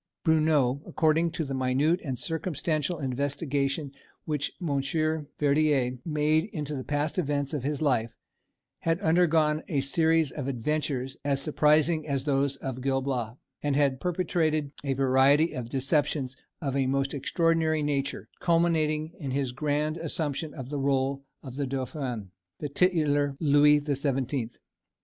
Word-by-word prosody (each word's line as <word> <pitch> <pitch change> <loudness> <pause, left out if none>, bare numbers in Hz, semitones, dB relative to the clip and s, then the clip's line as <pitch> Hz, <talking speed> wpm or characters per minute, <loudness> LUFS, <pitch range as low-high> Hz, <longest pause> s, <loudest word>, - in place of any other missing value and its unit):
Bruneau, 155 -5 +3
according 160 +1 +2
to 160 - -2
the 135 - -4
minute 135 +7 +1
and 130 -5 -3
circumstantial 160 0 -2
investigation 140 +1 -1 0.3
which 150 -2 -1
Monsieur 155 0 -1
Verdière 140 -4 +2
made 155 +1 +1
into 150 -8 -5
the 130 - -4
past 150 +5 -1
events 145 -2 -1
of 145 - -1
his 145 +3 -2
life, 120 -6 +1 0.6
had 165 +1 0
undergone 160 -3 +3
a 150 -6 0
series 160 +1 +2
of 140 -3 -5
adventures 135 0 -2
as 140 -1 +1
surprising 155 +2 +2
as 140 -2 -1
those 140 -1 +1
of 130 -1 -5
Gil 135 0 +1
Blas, 120 -4 -2 0.3
and 145 -2 0
had 140 -2 +2
perpetrated 165 -4 0
a 140 -2 0
variety 135 +4 +4
of 125 -4 -5
deceptions 135 0 0 0.3
of 135 -2 -1
a 135 -1 +1
most 135 +1 0
extraordinary 160 +1 +1
nature, 140 -2 -2
culminating 160 -2 +1
in 140 -5 -4
his 135 -1 -1
grand 150 +3 -1
assumption 155 -2 -2
of 130 -4 -7
the 145 -1 -3
rôle 135 0 0 0.2
of 130 -2 -8
the 140 -2 -1
dauphin, 130 - -4 0.3
the 150 - -4
titular 145 -4 +2
"Louis 150 -1 +5
the 145 -1 -1
Seventeenth." 130 -3 -2
145 Hz, 145 wpm, -28 LUFS, 135-155 Hz, 0.6 s, Louis